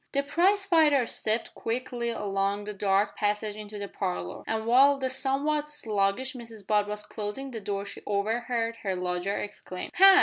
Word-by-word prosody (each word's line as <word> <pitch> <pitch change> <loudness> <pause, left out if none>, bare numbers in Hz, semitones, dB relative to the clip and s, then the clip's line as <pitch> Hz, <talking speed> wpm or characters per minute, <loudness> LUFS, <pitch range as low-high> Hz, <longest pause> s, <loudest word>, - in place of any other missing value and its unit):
The 280 0 +2
prize 375 +7 +3
fighter 310 -8 +4
stepped 220 0 -1
quickly 240 0 -3
along 200 -2 -1
the 210 0 -5
dark 200 0 +1
passage 210 0 -1
into 210 0 -8
the 200 0 -4
parlour, 90 - -4
and 220 0 -1
while 270 +4 +6
the 260 -1 -1
somewhat 280 +3 +1
sluggish 225 -3 0
Mrs 230 -5 -9
Butt 210 0 +2
was 210 0 -4
closing 220 +7 -5
the 225 -3 -6
door 200 0 -3
she - - -8
overheard 230 +3 -1
her 195 -4 -2
lodger 180 +2 -1
exclaim 185 -3 -6
"Ha! 390 +2 +9
220 Hz, 170 wpm, -28 LUFS, 205-265 Hz, -, Ha